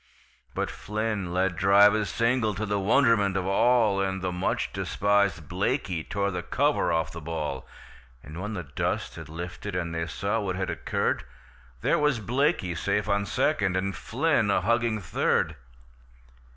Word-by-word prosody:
But - - -1
Flynn 105 -3 -3
let 90 0 +1
drive 100 +4 +6
a 110 -1 0
single 115 -2 +1
to 105 +3 -2
the 105 -1 -1
wonderment 105 -2 +3
of 95 - -1
all, 105 0 +3
And 95 -1 -2
the 95 - -1
much 90 +1 -1
despisèd 100 -6 +1
Blaikie 95 - -2
tore 100 +1 0
the 90 -1 -3
cover 145 - +1
off 80 -1 0
the 85 0 -8
ball; 75 -4 -4 0.6
And 80 +5 -8
when 105 +2 -4
the 90 - -4
dust 70 -3 -2
had 80 -3 -9
lifted, 90 +4 -6
and 85 -2 -2
they 85 0 -2
saw 100 +6 -1
what 95 -3 -2
had 95 0 -2
occurred, - - -1 0.6
There - - +2
was 150 -5 +2
Blaikie 125 - 0
safe 100 +3 0
on 100 0 +1
second 100 -11 +1
and 95 +1 -2
Flynn 125 -4 +1
a 100 - +2
hugging 115 -2 +1
third! 85 - 0
100 Hz, 165 wpm, -27 LUFS, 90-110 Hz, 0.6 s, drive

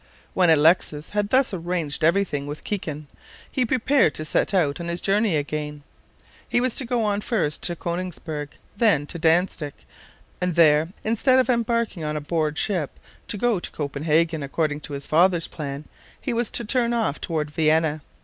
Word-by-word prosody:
When 180 -2 +3
Alexis 155 -1 +3
had 205 -1 -1
thus 260 -2 +3
arranged 170 -5 -3
every 180 +5 +4
thing 145 -6 -4
with 145 +1 -7
Kikin, 155 -7 -4 0.5
he 255 -2 0
prepared 260 - +2
to 155 - -2
set 155 - +1
out 165 -7 +1
on 170 - -5
his 170 +1 0
journey 200 -1 +2
again. 150 0 -3 0.7
He - - +2
was 250 -1 +1
to 265 - +3
go 235 -2 0
on 205 0 0
first 205 - -1
to 175 - -1
Konigsberg, 170 -4 -4 0.3
then 205 -10 +3
to 170 - -7
Dantzic, 165 -2 +1 0.7
and 180 -2 0
there, 155 -2 +5 0.2
instead 230 +4 +3
of 260 0 +3
embarking 235 -6 0
on 150 0 -2
board 155 -1 -1
a - - -2
ship 175 -9 -2 0.3
to - - -2
go 230 -2 +1
to - - -2
Copenhagen, 155 +2 0
according 145 +1 -1
to 150 - -8
his 140 0 -4
father's 175 +1 +3
plan, 145 -1 -6 0.3
he - - -3
was 235 -1 0
to 235 - -2
turn 240 +1 +1
off 220 -11 -1
toward 155 -3 -2
Vienna. 155 0 +2
170 Hz, 180 wpm, -24 LUFS, 150-210 Hz, 0.7 s, there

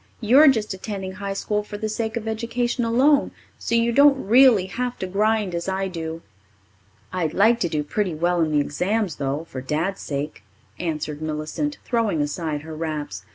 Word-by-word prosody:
You're 260 +7 +6
just 220 -7 +2
attending 190 0 -5
high 195 +1 -5
school 210 +1 -1
for 205 0 -8
the 215 - -3
sake 220 +1 -2
of 225 -1 -5
education 235 +2 -1
alone, 265 +6 +3 0.3
so 235 - -1
you 230 0 +3
don't 280 0 +5
really 235 -3 +6
have 245 +6 -3
to - - -3
grind 210 0 +1
as 170 +2 -3
I 190 0 -1
do." 165 -2 -6 0.9
"I'd 175 -4 -1
like 225 +4 +4
to 175 - 0
do 155 -2 -1
pretty 185 +2 -2
well 175 +2 +1
in 160 -1 +1
the 150 - +3
exams, 180 +5 -1
though, 140 +2 -2
for 130 - -6
Dad's 160 +9 -2
sake," 145 +1 -4 0.4
answered 155 -3 -3
Millicent, 155 - -3
throwing 230 -9 0
aside 150 0 -2
her 160 0 -8
wraps. 150 - -4
195 Hz, 180 wpm, -23 LUFS, 160-230 Hz, 0.9 s, You're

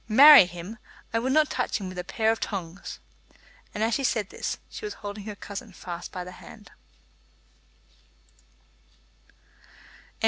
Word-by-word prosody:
Marry 280 +1 +10
him! 180 +5 -9 0.3
I 230 - +2
would 255 +3 -1
not 305 +1 +3
touch 250 - -1
him 195 - -6
with 185 -1 -6
a - - -3
pair 220 +4 +1
of 225 - -2
tongs." 185 -3 -5 0.8
As 220 +2 +1
she 275 - 0
said 220 -6 0
this, - - -3
she - - -10
was 420 - -4
holding 205 -1 -7
her 210 -1 -6
cousin 200 +1 -8
fast 175 -1 -7
by 180 - -5
the 180 - -9
hand. 210 +3 -14
210 Hz, 145 wpm, -26 LUFS, 185-230 Hz, 0.8 s, Marry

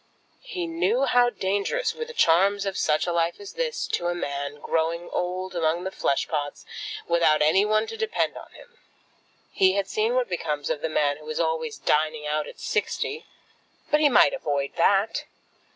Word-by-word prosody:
He 380 -8 -4
knew 380 +9 +1
how 245 0 +4
dangerous 205 - -1
were 465 - -5
the 475 - -10
charms 195 +5 +3
of 195 -1 -2
such 155 0 +1
a 175 - -1
life 170 0 0
as 400 - -9
this - - -2
to 175 - -1
a 175 - 0
man 140 -3 -4
growing 165 +3 -1
old 185 +1 -3
among 165 +1 0
the 190 - -3
flesh 140 - 0
pots, 145 -2 -4 0.4
without 170 -3 +3
any 190 +7 +4
one 215 +1 +2
to - - -7
depend 445 0 -1
upon - - -11
him. 485 0 -17 0.7
He 190 -1 +4
had 200 -1 0
seen 220 +4 0
what 255 -1 +1
becomes 150 -5 -2
of 150 - -2
the 160 - -1
man 145 -2 +1
who 155 0 -12
is 155 - -3
always 165 +8 -1
dining 155 0 0
out 150 0 -1
at - - -11
sixty. 450 +2 -2 0.6
But 300 - +4
he 300 -1 +5
might 245 - +5
avoid 145 - -2
that. 200 +5 +2
180 Hz, 185 wpm, -25 LUFS, 155-240 Hz, 0.7 s, he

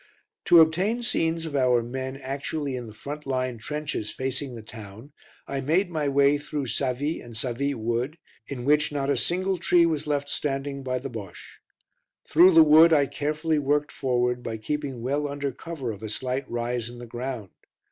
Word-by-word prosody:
To 170 -1 +8
obtain 190 +10 +2
scenes 165 -8 +1
of 155 -3 -5
our 125 -3 +3
men 130 +2 -5
actually 140 +1 -3
in 125 -2 -5
the - - -9
front 145 +6 -7
line 130 -3 -1
trenches 150 -3 -4
facing 130 0 -3
the 115 - -9
town, 110 +4 -11 0.3
I 135 -1 -3
made 175 +7 +1
my 150 -3 0
way 140 +1 +4
through 145 -1 -4
Savy 140 +4 -1
and 115 -2 -9
Savy 135 +4 -1
Wood, 120 +6 -2 0.3
in 125 -3 -6
which 150 +1 +3
not 140 -1 -1
a - - +2
single 185 +1 0
tree 175 0 +4
was 155 -3 -1
left 145 -1 0
standing 140 -1 -3
by 130 -1 -2
the 130 +1 -6
Bosche. 100 -7 -9 0.7
Through 175 +3 +6
the 165 - +10
wood 155 +2 +7
I 145 -2 +5
carefully 150 +3 -1
worked 145 +1 +1
forward 125 -2 0
by 115 -2 -4
keeping 135 +1 -4
well 145 +3 0
under 140 -1 -3
cover 140 -3 -5
of 100 -1 -9
a 110 - -5
slight 130 +5 -3
rise 120 0 -2
in 120 - -10
the 120 - -8
ground. 120 -4 -5
140 Hz, 185 wpm, -26 LUFS, 125-150 Hz, 0.7 s, the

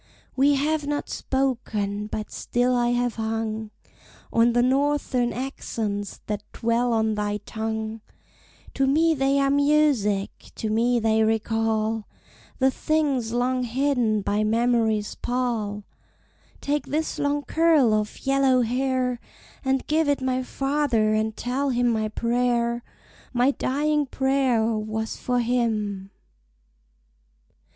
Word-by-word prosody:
We 280 +2 +4
have 295 +1 0
not 290 0 -2
spoken, 220 -6 -2
but 215 0 -5
still 245 +1 0
I 240 -1 +2
have 245 -1 0
hung 220 -1 -3 0.6
On 230 +1 +4
the 240 0 +3
Northern 265 -2 +1
accents 220 -5 -4
that 210 -1 -3
dwell 235 +1 +1
on 220 -1 +1
thy 210 0 -1
tongue. 220 0 -4 0.7
To 270 0 +1
me 320 +4 +3
they 275 -1 +1
are 275 0 +2
music, 280 -9 +2 0.2
to 220 - -3
me 240 +2 +2
they 220 0 +2
recall 220 0 0 0.5
The 265 0 +3
things 280 -7 0
long 250 +2 0
hidden 245 -4 +1
by 205 +2 0
Memory's 225 -1 +1
pall! 230 -5 -2 0.8
Take 290 +1 -1
this 310 +2 -2
long 290 0 0
curl 320 -9 +3
of 215 +3 -2
yellow 270 -2 +3
hair, 250 +1 0 0.4
And 265 -1 0
give 310 0 +1
it 285 - +2
my 260 -1 0
father, 270 -5 0
and 215 0 -1
tell 270 +3 -1
him 245 -1 +1
my 220 -2 0
prayer, 235 +1 0 0.5
My 250 +2 +3
dying 295 +2 0
prayer, 265 -4 +1
was 220 0 -2
for 245 -1 0
him." 215 -5 -1
245 Hz, 125 wpm, -24 LUFS, 220-270 Hz, 0.8 s, We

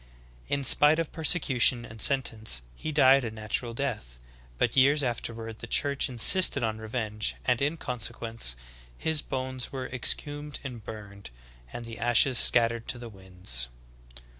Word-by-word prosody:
In 140 0 -2
spite 150 +4 +5
of 165 -2 -3
persecution 135 -7 +2
and 110 0 -10
sentence, 115 - +2
he 155 - -6
died 135 -2 +4
a 115 - -3
natural 110 +2 -5
death; 110 - -5 0.4
but - - 0
years 140 +3 +4
afterward 115 -2 -5
the - - -9
Church 140 -1 +1
insisted 140 - +4
on 110 -1 -2
revenge, 110 -1 -4
and 125 -1 +1
in 150 +4 -1
consequence, 115 - -2 0.4
his 160 - 0
bones 130 -1 -5
were 130 -1 -5
exhumed 145 +4 -2
and 125 -5 -8
burned, 100 -4 -10 0.4
and 120 - -8
the 115 0 -9
ashes 120 +1 +3
scattered 115 -1 +5
to - - -3
the 120 -1 -9
winds. 90 - -7
120 Hz, 145 wpm, -27 LUFS, 110-140 Hz, 0.4 s, spite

